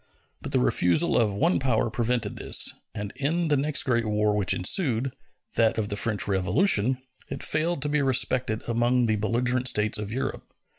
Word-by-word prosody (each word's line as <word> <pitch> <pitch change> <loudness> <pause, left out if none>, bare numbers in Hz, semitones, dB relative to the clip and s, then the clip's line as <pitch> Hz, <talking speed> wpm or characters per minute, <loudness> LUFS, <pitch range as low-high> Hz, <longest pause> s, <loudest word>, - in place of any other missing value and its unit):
But - - -7
the - - +1
refusal 90 - +2
of 110 -3 +2
one 160 - +1
power 120 -3 0
prevented 120 -2 -2
this, - - +2 0.2
and 105 -2 -5
in 160 +4 -1
the 150 - +3
next 140 +1 +1
great 120 -3 +1
war 105 0 +1
which 100 -3 0
ensued 130 - +1 0.4
that 115 0 +2
of 105 -2 -2
the 100 - -2
French 105 0 0
Revolution 105 - +2 0.3
it - - -4
failed 160 -1 0
to 145 - -1
be 150 0 +1
respected 130 -4 0
among 120 +1 +1
the 110 -1 0
belligerent 125 +4 0
States 105 -2 +1
of 105 -1 -5
Europe. 130 +4 -5
120 Hz, 180 wpm, -25 LUFS, 105-135 Hz, 0.4 s, the